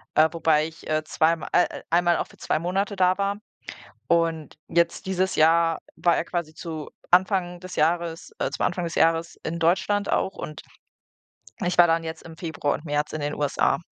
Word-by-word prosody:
äh, 155 +1 +6
wobei 160 -2 +2
ich, 165 0 -13
äh, 155 0 +1
zweim 160 +1 +1
äh, 180 - +2
einmal 175 0 +3
auch - - -2
für - - -19
2 155 - -1
Monate 195 +4 -1
da 185 0 +3
war. 200 +1 -1 0.7
Und 165 -2 +1
jetzt 170 +2 +1
dieses 190 0 0
Jahr 165 +1 +4 0.2
war 175 - +3
er - - -1
quasi 170 -3 -4
zu 160 -2 -6 0.2
Anfang 180 -1 +3
des 185 0 -8
Jahres, 165 +1 0
äh - - -1
zum - - 0
Anfang 175 0 -2
des 165 - -4
Jahres 165 +1 +2
in 165 +1 -3
Deutschland 190 +5 +1
auch 190 - 0
und 155 - -7 1.0
ich 180 0 0
war 175 - +9
dann 165 0 +2
jetzt 160 0 -6
im 165 -1 -11
Februar 160 -4 -2
und 150 - -6
März 145 0 -1
in 155 - -4
den 145 0 -2
USA. 140 -1 +1
165 Hz, 190 wpm, -25 LUFS, 160-180 Hz, 1.0 s, war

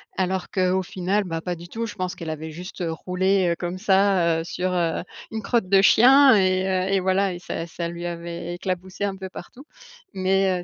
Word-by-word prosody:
alors 190 0 -1
qu'au 185 0 +1
final, 190 +3 -1
bah, 165 -2 -4
pas 180 +1 -3
du 170 +1 -11
tout, 230 +5 -4
je 215 - -7
pense 185 -2 -3
qu'elle 165 -2 -7
avait 160 0 -5
juste, 180 +4 -9
heu, 170 -2 -2
roulé, 185 +2 +1
heu, - - 0
comme 175 +1 -3
ça, 190 -4 +3
heu, - - -3
sur, 180 +1 -2
heu, 170 -2 0 0.3
une 220 0 -4
crotte 230 -4 0
de 195 0 +5
chien 265 +6 +7
et 185 -1 +2 0.3
heu 195 - 0
et 195 - +3
voilà 190 +1 +1
et 175 - -7
ça 170 -1 -5
ça 170 +1 -4
lui 170 0 -6
avait 170 0 -5
éclaboussé 185 +2 -4
un 195 -1 -1
peu 190 0 -6
partout 270 +8 -11 0.5
mais 190 -1 +1
heu, - - -10
185 Hz, 220 wpm, -23 LUFS, 175-195 Hz, 0.5 s, chien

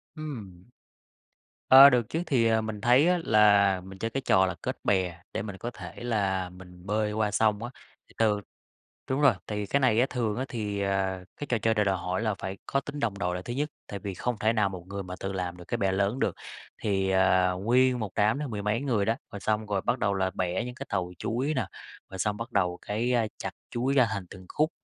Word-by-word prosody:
Ừm. 110 - -8 1.0
Ơ, 135 +2 +11
được 120 -4 +1
chứ 165 - -2
thì, 120 -6 +2
ờ, 110 0 +3
mình 110 -2 -5
thấy 125 - +5
á 180 0 +3
là 100 -3 +5
mình 95 +1 -11
chơi 115 +2 -2
cái 135 - -2
trò 95 -7 +4
là 95 - -2
kết - - -3
bè 90 -3 +1
để - - -2
mình 100 -2 -6
có 120 +5 -5
thể 120 - -9
là 95 -6 0
mình 90 0 -14
bơi 105 +1 0
qua 105 -1 0
sông 105 0 +2
á, 120 - -5 0.4
thì - - -21
từ 105 -2 +2 0.7
đúng 130 +2 0
rồi, 140 -4 +6
thì 105 -1 -3
cái 140 +8 +1
này 120 -4 +3
á 125 - +5
thường 115 -4 -1
á 130 - -1
thì, 105 -4 -3
ờ, 95 -1 -1
cái 145 - -5
trò 120 - +1
chơi 110 +1 +1
này 105 -2 +1
đòi 95 -1 +1
hỏi 90 +3 -2
là 110 -3 0
phải 95 +1 -5
có 135 - 0
tính 145 +2 -7
đồng 105 -6 -1
đội 90 -2 -1
là 90 - -4
thứ 120 - -5
nhất, 145 +4 -1 0.2
tại 100 - -6
vì 100 0 -5
không 120 +5 -2
thể 110 +1 +2
nào 105 -3 +2
một 90 -3 -8
người 100 0 -5
mà 90 0 -7
tự 95 - -3
làm 90 -2 -3
được 90 - -10
cái - - -1
bè 95 -1 +1
lớn 100 +6 0
được. - - 0 0.5
Thì, 95 -2 0
ờ, 95 -1 +3
nguyên 125 +3 +3
một 105 -3 -3
đám 110 +6 +2
đó 150 - -3
mười 105 -5 -4
mấy 105 +5 0
người 115 -8 +1
đó, 115 +2 +1 0.2
rồi 100 - -6
xong 110 +1 0
rồi 100 -2 -1
bắt 125 - 0
đầu 100 -2 +1
là 95 -1 0
bẻ 90 -1 -1
những 125 - -7
cái - - -7
tàu 90 -1 -1
chuối 130 +7 -1
nà, 130 - -1 0.4
rồi 95 - -8
xong 105 +1 0
bắt 115 - -6
đầu 90 -2 +1
cái, 115 +4 -1
ơ, 115 -3 +2
chặt - - -4 0.2
chuối 125 +3 0
ra 125 -4 +5
thành 100 -3 -4
từng 95 -1 -11
khúc, 155 +1 +1
105 Hz, 250 wpm, -28 LUFS, 95-120 Hz, 1.0 s, Ơ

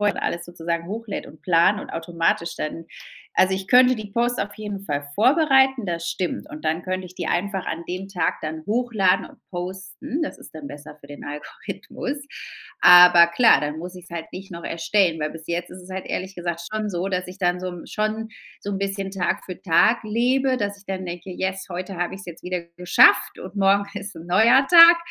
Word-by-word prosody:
her 205 -1 0
alles 170 - -2
sozusagen 170 -1 -4
hochlädt 215 +1 -5
und 155 - -15
plant 180 +3 +3
und - - -9
automatisch 170 0 -1
dann 165 +2 -5 0.5
also, 190 0 +4
ich 190 0 -5
könnte 255 0 +6
die 215 -1 -7
Posts 240 +1 0
auf 205 - -3
jeden 205 -2 -6
Fall 145 -4 -3
vorbereiten, 265 -1 +4
das 170 -2 -3
stimmt. 185 - -3
Und 305 0 -10
dann 160 +2 0
könnt 185 0 -3
ich 180 - -12
die - - -4
einfach 190 +1 -1
an 165 +1 -4
dem 185 +2 -5
Tag 180 -4 -1
dann 155 0 -5
hochladen 215 -5 +1
und - - -17
posten. 190 - -5
Das - - -4
ist - - -14
dann 155 -2 -8
besser 145 +1 -10
für 140 - -14
den 145 0 -11
Algorithmus. 150 - -6 0.6
Aber 175 -1 +9
klar, 225 +8 +5
dann 150 +1 -3
muss 180 +3 -7
ich's 180 -1 -12
halt 165 -1 -7
nicht 195 +1 -9
noch 170 -1 -8
erstellen, 165 -1 +1
weil 150 - -1
bis 160 -1 -11
jetzt 175 +1 -2
ist 185 - -11
es 180 - -14
halt 190 0 -5
ehrlich 190 +1 -4
gesagt 170 -1 -4
schon 215 -1 -2
so, 180 0 -2
dass 185 -1 -2
ich 180 +1 -10
dann 180 -2 0
so 185 -1 -5
schon 215 +1 -3 0.3
so 205 - -5
'n 195 - -2
bisschen 195 0 -3
Tag 190 -1 -2
für 185 -1 -8
Tag 195 +6 +3
lebe, 255 +4 +1
dass 205 -3 -3
ich 200 - -21
dann 190 -1 -4
denke, 175 +1 -7
yes, 190 +1 -3
heute 185 +1 -6
hab 175 +1 -1
ich's 195 +2 -9
jetzt 170 -2 -10
wieder 180 -1 -3 0.2
geschafft 180 +3 +4
und 185 0 -9
morgen 200 0 +3 0.2
ist 200 -3 -9
'n 165 - -9
neuer 230 +9 +5
Tag. 335 0 +10
185 Hz, 210 wpm, -23 LUFS, 170-210 Hz, 0.6 s, Tag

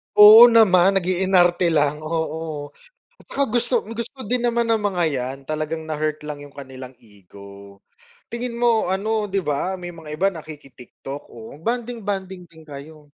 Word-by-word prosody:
Oo 215 +3 +10
naman, 195 -5 +4
nag-iinarte 180 -2 +2
lang, 150 0 +1
oo. 155 -2 -5 0.5
At - - -25
tsaka 280 - 0
gusto 240 0 0
gusto 235 +4 -7
din 245 +3 0
naman 235 -1 0
ng 220 - -1
mga 185 -4 -1
yan 130 +1 -4
talagang 155 +1 -4
na-hurt 155 -1 -3
lang 150 -1 -7
'yong 145 -1 -13
kanilang 130 -2 -10
ego. 100 -1 -15 0.6
Tingin 235 0 -4
mo 230 -5 +1
ano, 210 +2 -1
'di 195 -1 -2
ba, 180 +6 -2
may 175 -1 -8
mga 160 -2 -12
iba 195 +3 +2
nakiki 150 -5 -11
TikTok, 135 +3 -10
o 120 +6 -12
bonding-bonding 205 -6 -4
din 160 -1 -17
kayo. 150 +1 -12
170 Hz, 155 wpm, -21 LUFS, 145-210 Hz, 0.6 s, Oo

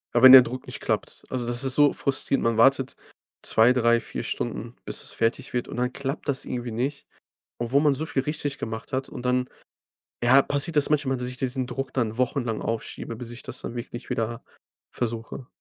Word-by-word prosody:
Ja, 120 - +3
wenn 130 - +12
der 130 0 +13
Druck 125 +1 -5
nicht - - -7
klappt. - - -2
Also, 125 -2 -2
das 120 +2 -1
ist 135 -1 -1
so 145 -1 +5
frustrierend, 135 0 0
man 115 -1 +1
wartet 135 +2 +4 0.5
2, 115 +3 +5
3, 120 -1 +4
4 - - -5
Stunden, - - -4
bis - - -5
es - - -9
fertig 115 0 -1
wird 120 -1 -1
und - - -7
dann 125 +1 0
klappt 140 +3 -4
das 135 -2 -1
irgendwie 120 -1 -4
nicht, 135 +6 -3 0.5
obwohl 120 +4 +2
man 145 -2 +3
so 155 - -3
viel 135 -4 -1
richtig 145 -1 -3
gemacht 110 +5 -6
hat 130 +1 -1
und 125 - -8
dann 125 0 +1 0.7
ja, 130 +3 +7
passiert 145 +4 -2
das 145 - +3
manchmal, 140 -3 +2
dass 125 - -3
sich 125 0 -5
diesen 130 0 -2
Druck 135 +1 -4
dann 115 -4 -1
wochenlang 125 -3 0
aufschiebe, 115 0 -4
bis 120 0 -8
ich 120 +3 -8
das 130 -1 -7
dann 120 - -6
wirklich 120 +1 -7
wieder 115 +1 -2 0.5
versuche. 115 +1 -4
125 Hz, 210 wpm, -25 LUFS, 120-135 Hz, 0.7 s, der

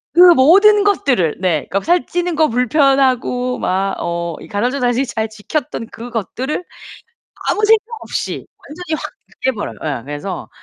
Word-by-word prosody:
그 - - +3 0.2
모든 400 +10 +6
것들을 270 - +1
네. 165 -6 0 0.2
살 350 +1 +2
찌는 350 -1 -2
거 310 0 +3
불편하고 250 0 +1
막 195 +1 -1
어 170 -1 -3
이 - - -11
간헐적 245 +6 -1
단식 245 +2 +1
잘 220 -3 -3
지켰던 225 +2 -4
그것들을 245 - -4 0.9
아무 425 - +1
생각 440 0 +4 0.2
없이 - - -4 0.2
완전히 320 +1 -4
확 - - -6 0.3
깨 260 - +3
버려요. 210 -4 -5
예 140 -6 -3
그래서 145 +6 -6
250 Hz, 275 characters per minute, -17 LUFS, 205-315 Hz, 0.9 s, 모든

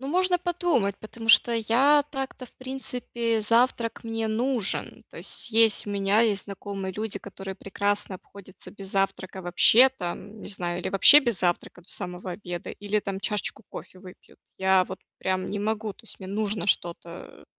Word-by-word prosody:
Ну, 270 - -6
можно 360 +3 +2
подумать, 345 - 0
потому 225 +1 -9
что 235 - +7
я 255 +7 +4
так-то 265 -2 -5
в - - -22
принципе, 245 -3 -3
завтрак 230 +1 +2
мне 225 0 -2
нужен. 230 0 -1
То - - -14
есть 225 -2 +2
у - - -4
меня 200 +1 +2
есть 215 -4 +1
знакомые 195 -1 -6
люди, 210 0 -4
которые 195 -1 -8
прекрасно 200 0 -2
обходятся 195 0 -12
без 195 -1 -8
завтрака 195 -1 -2
вообще, 220 +8 +6
там, 205 -2 -7
не - - -8
знаю, 175 -3 -2
или - - -3
вообще 200 +10 +8
без 240 -8 -1
завтрака 175 0 -1
до 175 - -25
самого 180 -1 -5
обеда, 175 -2 -7
или, 205 +1 -2
там, 195 -1 -5
чашечку 210 +2 -2
кофе 185 - -10
выпьют. 185 -1 -15 0.2
Я 190 -1 +3
вот 190 +1 -8 0.2
прям 185 0 -2
не 205 - -3
могу, 215 0 -2
то - - -19
есть - - -7
мне 190 -1 -9
нужно 210 +1 -2
что-то, 170 -3 0 0.2
э, - - -17
205 Hz, 175 wpm, -26 LUFS, 190-230 Hz, 0.2 s, вообще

